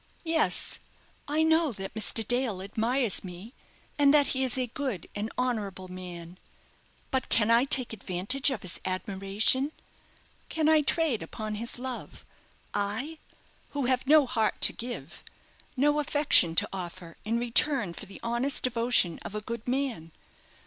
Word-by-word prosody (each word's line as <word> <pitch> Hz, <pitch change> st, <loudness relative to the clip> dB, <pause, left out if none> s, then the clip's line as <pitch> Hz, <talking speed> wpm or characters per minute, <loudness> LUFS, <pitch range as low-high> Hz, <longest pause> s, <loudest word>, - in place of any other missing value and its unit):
"Yes, 325 Hz, 0 st, +2 dB, 0.5 s
I 305 Hz, +2 st, +1 dB
know, 320 Hz, -1 st, +3 dB
that 195 Hz, -1 st, -6 dB
Mr. 220 Hz, 0 st, +3 dB
Dale 245 Hz, -6 st, 0 dB
admires 225 Hz, +3 st, +2 dB
me, 185 Hz, +6 st, -10 dB, 0.5 s
and 285 Hz, -1 st, +5 dB
that 290 Hz, -1 st, +4 dB
he 265 Hz, 0 st, 0 dB
is 260 Hz, 0 st, +1 dB
a 255 Hz, -, 0 dB
good 245 Hz, -, -5 dB
and 210 Hz, +2 st, -4 dB
honourable 205 Hz, -7 st, -3 dB
man; 180 Hz, -1 st, -9 dB, 0.7 s
but 260 Hz, -1 st, -1 dB
can 225 Hz, 0 st, +2 dB
I 235 Hz, +3 st, +5 dB
take 255 Hz, -4 st, +3 dB
advantage 210 Hz, +7 st, -1 dB
of 255 Hz, -7 st, -4 dB
his 185 Hz, -, -5 dB
admiration? 195 Hz, +8 st, 0 dB, 0.8 s
Can 315 Hz, -1 st, 0 dB
I 315 Hz, -1 st, +5 dB
trade 295 Hz, -5 st, +2 dB
upon 215 Hz, -1 st, -6 dB
his 230 Hz, +4 st, -5 dB
love? 255 Hz, 0 st, -7 dB, 0.5 s
I 220 Hz, +11 st, -3 dB, 0.6 s
who 280 Hz, -, 0 dB
have 255 Hz, +1 st, 0 dB
no 300 Hz, 0 st, +6 dB
heart 230 Hz, -4 st, -1 dB
to -, -, +9 dB
give, 230 Hz, -, -8 dB, 0.5 s
no 295 Hz, +3 st, +2 dB
affection 290 Hz, -, +3 dB
to 205 Hz, +4 st, +1 dB
offer 175 Hz, -2 st, -8 dB
in 225 Hz, +2 st, -1 dB
return 240 Hz, -, +2 dB
for 210 Hz, -, -9 dB
the 195 Hz, -, -11 dB
honest 240 Hz, +4 st, -1 dB
devotion 230 Hz, -7 st, +2 dB
of 210 Hz, -, -8 dB
a 210 Hz, -, -3 dB
good 235 Hz, +2 st, -7 dB
man? 245 Hz, -, -2 dB
235 Hz, 150 wpm, -28 LUFS, 195-270 Hz, 0.8 s, to